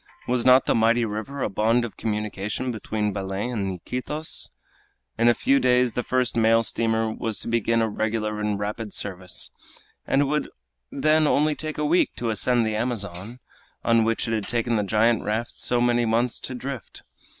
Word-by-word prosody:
Was 125 -1 +1
not 130 +1 +6
the - - +2
mighty 115 +1 +3
river 110 +6 -4
a - - 0
bond 115 +4 +2
of 115 - -8
communication 105 +3 -3
between 105 -2 -2
Belem 95 +4 -3
and 100 -5 -2
Iquitos? 150 - -4 0.7
In 115 +1 +2
a 120 - +5
few 140 0 +3
days 125 -2 +3
the 125 - -1
first 125 0 0
mail 115 0 +4
steamer 110 -1 0
was 110 -2 -3
to - - -6
begin 115 0 +2
a - - +1
regular 110 0 -2
and 105 -1 -1
rapid 105 +1 -4
service, 90 -2 -5 0.6
and 140 - +3
it - - 0
would 150 +2 -1 0.4
then 155 0 +3
only 150 +1 +3
take 155 +1 -6
a 150 - 0
week 170 +4 +2
to 115 -2 -2
ascend 120 +2 +2
the 110 -1 -1
Amazon, 110 -1 -3 0.4
on 115 -1 +4
which 115 +1 0
it 115 - -1
had 110 -3 -2
taken 120 0 0
the 105 - +2
giant 110 +3 +2
raft 110 +3 -2
so 125 - -1
many 120 -1 +2
months 115 +2 +1
to 130 - -5
drift. 130 -3 -7
115 Hz, 185 wpm, -24 LUFS, 105-125 Hz, 0.7 s, not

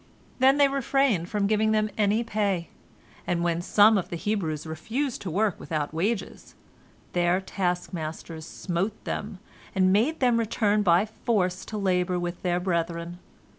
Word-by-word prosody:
Then 265 +2 +5
they 285 -1 +6
refrained 270 -9 +1
from 205 -1 0
giving 215 +1 +2
them 215 0 +1
any 210 +2 +2
pay, 200 -6 -1 0.6
and 170 -1 0
when 170 0 0
some 210 +3 +5
of 180 - -6
the - - -4
Hebrews 165 -5 -2
refused 225 - -3
to 190 - -4
work 200 +3 0
without 155 -2 -3
wages, 195 +6 -3 0.6
their 175 +1 +2
taskmasters 175 -4 -4
smote 190 +4 -3
them, 205 -1 -4 0.4
and 185 0 +4
made 250 +11 +2
them 245 -3 +3
return 215 -2 +1
by 180 0 +4
force 200 -5 -1
to 215 - -5
labor 180 -2 +1
with 175 0 -4
their 175 -1 0
brethren. 170 -1 -2
195 Hz, 150 wpm, -26 LUFS, 175-220 Hz, 0.6 s, they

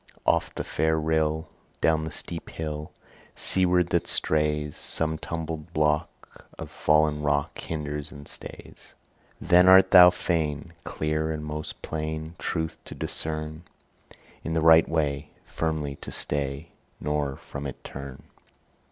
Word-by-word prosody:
Oft - - +1
the - - -3
fair 80 0 +1
rill, 80 0 0 0.3
Down 80 -1 +2
the 80 - -5
steep - - -5
hill 75 -1 -5 0.4
Seaward 90 -2 +2
that 85 - +1
strays, 75 -1 0
Some 80 -1 +1
tumbled 80 0 -5
block 75 -1 +2 0.5
Of - - -7
fallen 75 -1 +2
rock 70 -1 0
Hinders 75 -2 -4
and 70 -1 -11
stays. - - -11 0.4
Then 90 +1 +5
art 95 0 +8
thou 90 -2 +10
fain 85 -4 -2
Clear 75 0 -1
and 75 -1 -4
most 75 0 -6
plain 80 0 -4
Truth 80 -2 -2
to - - -9
discern, 80 0 -4 0.8
In 80 - -2
the 80 - +2
right 80 0 +7
way 75 -2 -1 0.2
Firmly 75 -3 -2
to - - -9
stay, 70 +2 -3 0.3
Nor 75 -2 -1
from 70 0 -7
it 70 - -9
turn? 70 -1 -8
80 Hz, 135 wpm, -26 LUFS, 75-80 Hz, 0.8 s, thou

